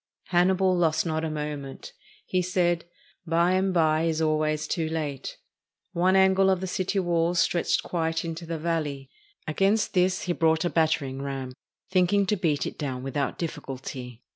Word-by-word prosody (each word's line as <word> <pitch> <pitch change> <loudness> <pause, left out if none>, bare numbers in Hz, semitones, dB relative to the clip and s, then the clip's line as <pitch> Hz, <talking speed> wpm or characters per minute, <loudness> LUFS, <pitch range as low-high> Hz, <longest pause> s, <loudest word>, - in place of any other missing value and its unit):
Hannibal 185 +1 +3
lost 165 -2 +2
not 160 -1 -1
a 160 - -1
moment. 150 -3 -5 0.3
He 185 - 0
said, 175 -2 +1 0.4
"By 170 +2 +3
and 190 +1 +2
by 160 -2 +2
is 160 -1 0
always 155 -1 +1
too 160 -2 -1
late." 150 -4 -4 0.5
One 185 +2 +2
angle 190 0 +5
of 190 -1 +2
the 190 - -3
city 185 +2 -2
wall 175 -2 +1
stretched 175 0 +1
quite 165 -1 -1
into 165 0 -5
the 165 0 -3
valley. 150 -4 -3 0.4
Against 195 +7 +1
this 185 +1 +2
he 175 - 0
brought 160 0 +2
a 175 - 0
batter 160 -3 +2
ing 135 0 -6
ram, 135 -2 -4 0.4
thinking 185 +2 +3
to 210 - +1
beat 160 -7 0
it - - -6
down 130 -4 -3
without 135 +1 -2
difficulty. 130 -6 -6
165 Hz, 165 wpm, -26 LUFS, 150-180 Hz, 0.5 s, angle